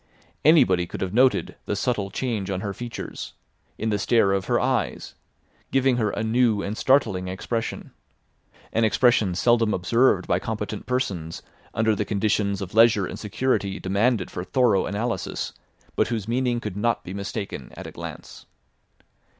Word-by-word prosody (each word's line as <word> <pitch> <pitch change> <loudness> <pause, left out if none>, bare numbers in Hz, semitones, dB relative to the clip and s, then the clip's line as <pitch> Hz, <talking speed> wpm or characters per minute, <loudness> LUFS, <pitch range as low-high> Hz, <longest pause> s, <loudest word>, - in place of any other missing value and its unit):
Anybody 95 - +5
could - - -7
have 95 0 -2
noted 130 +3 +3
the 105 - 0
subtle 100 -1 -1
change 105 -3 -3
on 95 -1 -2
her 100 -1 -3
features, 120 +3 -7 0.4
in 110 - -1
the 105 - 0
stare 105 -1 +3
of 95 -1 -1
her - - +2
eyes, - - -1 0.6
giving 135 -2 +2
her 110 -3 +1
a 110 - -3
new 110 -2 +2
and 105 - -3
startling 110 -9 +2
expression; 110 +5 -4 0.8
an 115 - +2
expression 110 -3 +3
seldom 115 +1 +3
observed 100 +1 +2
by 90 - +2
competent 105 0 -5
persons 95 -11 -2 0.3
under 110 -1 +2
the 105 - -1
conditions 100 -1 0
of 95 - -8
leisure 110 -3 +5
and - - -7
security 105 -2 -1
demanded 100 +2 +1
for 90 - -4
thorough 120 -2 +2
analysis, 105 0 -3 0.4
but - - +2
whose 110 -4 -3
meaning 120 0 0
could 105 -5 -5
not 115 +2 0
be 90 - -7
mistaken 100 +1 -5
at - - -7
a - - -7
glance. - - -9
105 Hz, 160 wpm, -24 LUFS, 95-120 Hz, 0.8 s, Anybody